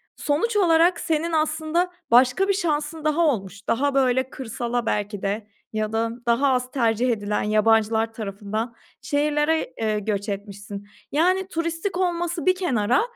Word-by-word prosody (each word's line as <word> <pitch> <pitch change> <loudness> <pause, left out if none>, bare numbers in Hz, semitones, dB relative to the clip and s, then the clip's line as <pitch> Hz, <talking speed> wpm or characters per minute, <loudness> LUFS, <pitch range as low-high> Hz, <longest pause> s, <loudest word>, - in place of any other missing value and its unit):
sonuç 340 +11 0
olarak 340 -2 +4
senin 330 -1 -1
aslında 315 +3 0 0.2
başka 255 +11 +5
bir 395 - +3
şansın 315 -4 -2
daha 305 +2 +2
olmuş. 200 - -3
Daha, 280 +4 +1
böyle, 260 -1 +2
kırsala 240 -2 -3
belki 205 -1 -2
de 205 +2 -2 0.3
ya 215 0 -2
da 225 0 0
daha 240 +4 +3
az 250 0 -1
tercih 235 -1 +1
edilen 210 -2 -1
yabancılar 220 +1 +2
tarafından 215 +2 -4 0.3
şehirlere, 295 +2 0
eee, 215 -1 +1
göç 205 0 -2
etmişsin. 200 0 -6 0.2
Yani, 370 +5 +2
turistik 335 +2 -2
olması 350 -2 -1
bir 370 0 +4
kenara, 250 - +1
255 Hz, 140 wpm, -24 LUFS, 215-325 Hz, 0.3 s, başka